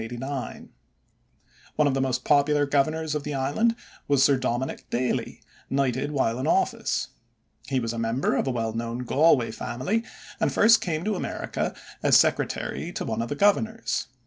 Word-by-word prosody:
One 150 - +3
of 140 - +1
the 135 - 0
most 130 -1 -1
popular 145 0 +3
governors 155 +3 0
of 150 - -1
the 145 0 -4
island 145 +13 +1 0.3
was 140 -2 +4
Sir 140 0 +5
Dominick 130 0 -3
Daly, 125 +1 -2 0.3
knighted 135 0 0
while 125 -4 0
in 130 - -2
office. - - 0 0.6
He 135 - 0
was 115 -1 -3
a 115 - -4
member 115 +4 0
of - - 0
a - - +1
well 115 -2 -2
known 115 +2 -3
Galway 135 -2 +3
family, 130 - -2 0.4
and - - +1
first 220 0 +5
came 165 -4 -2
to 215 - 0
America 190 - -3 0.3
as - - +6
secretary - - 0
to - - -4
one 115 0 -2
of 115 - -4
the - - -2
governors. 220 +5 +1
135 Hz, 165 wpm, -26 LUFS, 125-155 Hz, 0.6 s, as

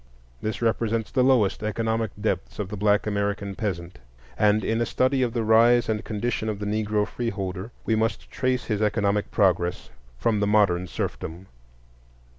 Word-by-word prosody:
This 110 +2 -3
represents 115 -1 0
the 130 - +2
lowest 125 -7 +3
economic 110 +1 -1
depths 100 -4 -2
of 105 -3 -3
the 105 - -4
black 105 0 +2
American 100 -1 -1
peasant; 90 - -4 0.4
and 105 0 +3
in 115 +1 0
a - - +2
study 130 +1 +1
of 125 -2 +1
the 115 -2 0
rise 115 +2 +5
and 110 -1 -1
condition 110 0 -2
of 105 - -2
the 105 - -5
Negro 105 0 0
freeholder 100 -4 -4 0.2
we 110 - +2
must 110 0 -1
trace 130 -1 0
his 105 -2 -1
economic 105 -1 +1
progress 90 -3 +1 0.3
from 105 - +1
the 100 - +1
modern 100 -4 +3
serfdom. 85 +2 -5
105 Hz, 165 wpm, -25 LUFS, 100-115 Hz, 0.4 s, rise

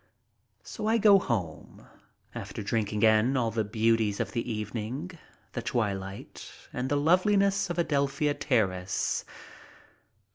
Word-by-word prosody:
So 215 - -5
I 225 +1 +3
go 205 -2 +6
home, 90 - -4 0.5
after 110 - -6
drinking 105 0 -1
in 110 +4 +4
all 115 -3 +1
the 110 0 0
beauties 110 -1 +1
of - - -2
the 115 - -3
evening, 110 - -4 0.4
the - - -3
twilight, 100 -4 -4 0.2
and 125 +1 -2
the 145 - +1
loveliness 195 +5 +3
of 175 - -3
Adelphia 145 -2 +1
Ter 130 -6 +2
race. 90 0 -2
115 Hz, 130 wpm, -28 LUFS, 105-150 Hz, 0.5 s, go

